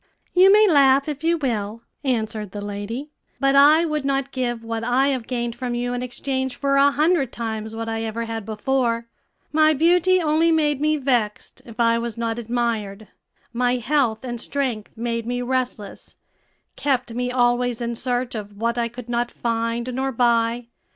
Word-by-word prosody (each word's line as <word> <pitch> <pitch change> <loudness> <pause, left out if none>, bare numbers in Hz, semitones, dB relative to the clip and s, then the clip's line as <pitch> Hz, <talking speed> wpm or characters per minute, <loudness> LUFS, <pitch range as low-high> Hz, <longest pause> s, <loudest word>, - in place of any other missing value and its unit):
"You 370 +2 +7
may 425 +1 +6
laugh 275 -4 +5
if 295 0 -5
you 335 +1 +2
will," 230 -5 -3 0.2
answered 220 -6 -2
the 205 - -5
lady; 215 +8 -5 0.3
"but 275 0 +2
I 300 +4 +6
would 305 -3 -2
not 275 0 -1
give 240 -3 -2
what 230 0 -4
I 255 +4 +2
have 255 -5 -2
gained 240 -2 -2
from 245 0 -3
you 245 +1 -2
in 245 - -3
exchange 260 +1 -3
for 275 -1 0
a 280 +1 +6
hundred 300 -2 +1
times 220 -1 -5
what 225 0 -4
I 225 0 -2
ever 225 +1 -3
had 225 -1 -4
before. 230 +2 -1 0.5
My 310 0 +4
beauty 355 +4 +4
only 325 0 +2
made 295 -3 +1
me 305 0 +2
vexed 245 -7 -1
if 230 -1 -12
I 230 0 +3
was 235 -1 -4
not 230 0 -2
admired; 220 -3 -2 0.4
my 245 +1 +1
health 245 -2 0
and 240 -2 -5
strength 255 -7 -3
made 230 0 -3
me 245 0 -2
restless, 250 -5 -4 0.6
kept 260 -4 -1
me 250 +1 -2
always 245 -1 +1
in 235 0 -2
search 245 +1 -2
of 205 -2 -7
what 235 +2 -1
I 235 - +1
could 240 0 -10
not 240 0 -1
find 235 +1 -2
nor 265 +2 -1
buy. 235 -1 +1
245 Hz, 180 wpm, -22 LUFS, 230-275 Hz, 0.6 s, You